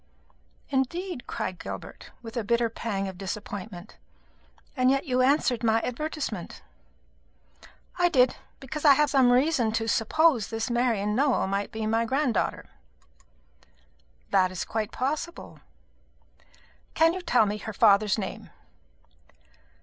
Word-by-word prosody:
"Indeed!" 275 Hz, +2 st, -2 dB
cried 185 Hz, -1 st, -4 dB
Gilbert, -, -, -8 dB
with 225 Hz, -1 st, -9 dB
a 235 Hz, -, -1 dB
bitter 235 Hz, +2 st, +1 dB
pang 205 Hz, -3 st, -3 dB
of 190 Hz, -1 st, -8 dB
disappointment; 200 Hz, -1 st, -7 dB, 0.8 s
"and 255 Hz, -1 st, +3 dB
yet 275 Hz, +1 st, +1 dB
you 255 Hz, -1 st, +1 dB
answered 255 Hz, -3 st, +2 dB
my 225 Hz, 0 st, +3 dB
advertisement." 305 Hz, +4 st, -5 dB, 1.4 s
"I 355 Hz, 0 st, +4 dB
did, 255 Hz, -5 st, +3 dB, 0.2 s
because 280 Hz, +3 st, -6 dB
I 285 Hz, -3 st, +7 dB
have 300 Hz, +1 st, +2 dB
some 260 Hz, -3 st, +4 dB
reason 255 Hz, -3 st, +2 dB
to 225 Hz, 0 st, -1 dB
suppose 235 Hz, +1 st, +2 dB
this 225 Hz, +2 st, -3 dB
Marian 230 Hz, -4 st, +1 dB
Nowell 270 Hz, 0 st, +2 dB
may 200 Hz, +1 st, -1 dB
be 220 Hz, 0 st, -5 dB
my 225 Hz, +1 st, +1 dB
granddaughter." 260 Hz, -2 st, -1 dB, 1.6 s
"That 185 Hz, -, +4 dB
is 185 Hz, -, -4 dB
quite 220 Hz, -1 st, -3 dB
possible." 305 Hz, +6 st, -4 dB, 1.4 s
"Can 325 Hz, +1 st, +4 dB
you 370 Hz, -, -5 dB
tell 250 Hz, -10 st, +3 dB
me 210 Hz, +1 st, -3 dB
her 220 Hz, -, -6 dB
father's 205 Hz, -1 st, +4 dB
name?" 195 Hz, -3 st, -6 dB
235 Hz, 125 wpm, -26 LUFS, 215-275 Hz, 1.6 s, I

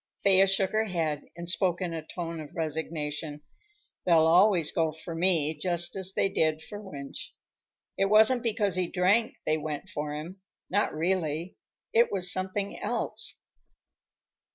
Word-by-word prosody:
Thea 195 Hz, 0 st, +6 dB
shook 195 Hz, 0 st, +1 dB
her 220 Hz, +1 st, +1 dB
head 160 Hz, -7 st, -2 dB
and 170 Hz, 0 st, -7 dB
spoke 175 Hz, 0 st, +1 dB
in 180 Hz, -3 st, -3 dB
a 165 Hz, -, -4 dB
tone 165 Hz, 0 st, -6 dB
of 150 Hz, -2 st, -10 dB
resignation. 155 Hz, -1 st, -4 dB, 0.6 s
"They'll 165 Hz, -3 st, +5 dB
always 175 Hz, -1 st, +5 dB
go 160 Hz, -2 st, +1 dB
for 160 Hz, +2 st, -8 dB
me, 165 Hz, -3 st, +2 dB
just 175 Hz, +2 st, 0 dB
as 190 Hz, 0 st, 0 dB
they -, -, +2 dB
did 155 Hz, -4 st, 0 dB
for 205 Hz, +4 st, -8 dB
Wunsch. 140 Hz, -9 st, -8 dB, 0.7 s
It 195 Hz, -, +4 dB
wasn't 220 Hz, +5 st, +5 dB
because 215 Hz, -4 st, 0 dB
he 180 Hz, 0 st, +1 dB
drank 200 Hz, +6 st, +2 dB
they 155 Hz, 0 st, +1 dB
went 150 Hz, -1 st, -5 dB
for 150 Hz, 0 st, -4 dB
him; 170 Hz, +6 st, -8 dB, 0.3 s
not 205 Hz, +3 st, +1 dB
really. 165 Hz, 0 st, -2 dB, 0.4 s
It 235 Hz, +1 st, +4 dB
was 180 Hz, -2 st, +2 dB
something 190 Hz, +2 st, -3 dB
else." -, -, -2 dB
175 Hz, 155 wpm, -28 LUFS, 155-195 Hz, 0.7 s, Thea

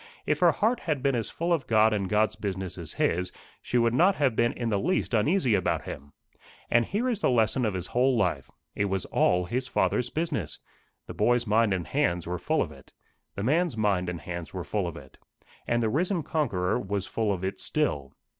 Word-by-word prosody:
If -, -, +1 dB
her -, -, +6 dB
heart 225 Hz, +4 st, +1 dB
had 150 Hz, -5 st, -2 dB
been 140 Hz, -1 st, +2 dB
as 115 Hz, -3 st, -2 dB
full 170 Hz, +1 st, -1 dB
of 140 Hz, -6 st, -1 dB
God 110 Hz, -1 st, +4 dB
and 100 Hz, -3 st, -1 dB
God's 110 Hz, +1 st, +2 dB
business 95 Hz, -3 st, -4 dB
as -, -, -7 dB
his, 90 Hz, +1 st, 0 dB, 0.3 s
she 125 Hz, -, -1 dB
would 115 Hz, -1 st, +3 dB
not 180 Hz, +9 st, +4 dB
have 135 Hz, -6 st, +1 dB
been 120 Hz, +1 st, +2 dB
in 120 Hz, -2 st, -3 dB
the 100 Hz, -3 st, +1 dB
least 180 Hz, -, 0 dB
uneasy 125 Hz, -, +2 dB
about 95 Hz, -3 st, +1 dB
him. 70 Hz, +2 st, -8 dB, 0.6 s
And 120 Hz, 0 st, +4 dB
here 220 Hz, +6 st, -1 dB
is 230 Hz, -5 st, -1 dB
the -, -, +3 dB
lesson 115 Hz, 0 st, +2 dB
of 105 Hz, -3 st, -1 dB
his 90 Hz, -1 st, -3 dB
whole 125 Hz, +4 st, +2 dB
life: 80 Hz, -10 st, 0 dB, 0.2 s
it 100 Hz, -, 0 dB
was 95 Hz, -2 st, -1 dB
all 90 Hz, 0 st, +2 dB
his 125 Hz, +6 st, -2 dB
Father's 125 Hz, -1 st, 0 dB
business. 110 Hz, -, -2 dB, 0.5 s
The -, -, -8 dB
boy's 120 Hz, +3 st, +2 dB
mind 110 Hz, 0 st, +3 dB
and 90 Hz, -3 st, -1 dB
hands 85 Hz, +4 st, 0 dB
were 90 Hz, 0 st, -3 dB
full 90 Hz, -, +1 dB
of -, -, -8 dB
it. -, -, -15 dB, 0.4 s
The 100 Hz, -, -3 dB
man's 155 Hz, +2 st, +1 dB
mind 100 Hz, -4 st, +1 dB
and 85 Hz, -2 st, -5 dB
hands 85 Hz, 0 st, -6 dB
were 90 Hz, -, -3 dB
full 90 Hz, +5 st, -2 dB
of 85 Hz, -, -6 dB
it. 70 Hz, -2 st, -14 dB, 0.5 s
And 120 Hz, 0 st, +1 dB
the 110 Hz, -, +1 dB
risen 175 Hz, -, 0 dB
conqueror 115 Hz, -, 0 dB
was 100 Hz, -3 st, -2 dB
full 110 Hz, -1 st, -1 dB
of 95 Hz, -2 st, -3 dB
it 95 Hz, +1 st, -3 dB
still. 75 Hz, -, -1 dB
110 Hz, 220 wpm, -27 LUFS, 95-130 Hz, 0.6 s, her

